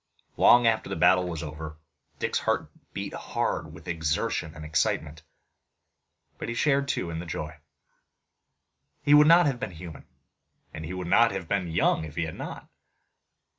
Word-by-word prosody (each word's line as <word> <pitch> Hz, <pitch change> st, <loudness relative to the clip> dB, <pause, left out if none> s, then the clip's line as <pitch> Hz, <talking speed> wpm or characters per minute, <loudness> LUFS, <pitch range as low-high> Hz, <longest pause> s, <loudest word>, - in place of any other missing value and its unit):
Long 120 Hz, 0 st, +6 dB
after 115 Hz, -1 st, +2 dB
the -, -, -3 dB
battle 90 Hz, +2 st, +4 dB
was 80 Hz, -2 st, -5 dB
over, 75 Hz, +1 st, -7 dB, 0.4 s
Dick's -, -, -1 dB
heart -, -, -1 dB, 0.2 s
beat -, -, -5 dB
hard -, -, -2 dB
with 85 Hz, +2 st, -13 dB
exertion 80 Hz, -1 st, -1 dB
and 75 Hz, -1 st, -8 dB
excitement. 80 Hz, 0 st, -1 dB, 1.2 s
But -, -, -4 dB
he 115 Hz, -, -3 dB
shared 140 Hz, +1 st, +2 dB
too 85 Hz, -10 st, -2 dB
in 80 Hz, -, -4 dB
the 85 Hz, -, -6 dB
joy. 75 Hz, -1 st, -5 dB, 1.5 s
He 145 Hz, -, +4 dB
would 150 Hz, 0 st, +8 dB
not 170 Hz, +2 st, +7 dB
have 135 Hz, -4 st, 0 dB
been 135 Hz, -, -3 dB
human, 85 Hz, -3 st, -10 dB, 0.7 s
and 80 Hz, 0 st, -6 dB
he 90 Hz, -, -6 dB
would 90 Hz, -1 st, -4 dB
not 115 Hz, +6 st, +5 dB
have 95 Hz, -4 st, -5 dB
been 95 Hz, -1 st, 0 dB
young 80 Hz, -1 st, +1 dB
if 75 Hz, -1 st, -9 dB
he 85 Hz, -, 0 dB
had 80 Hz, -, -4 dB
not. -, -, -8 dB
85 Hz, 170 wpm, -27 LUFS, 80-115 Hz, 1.5 s, would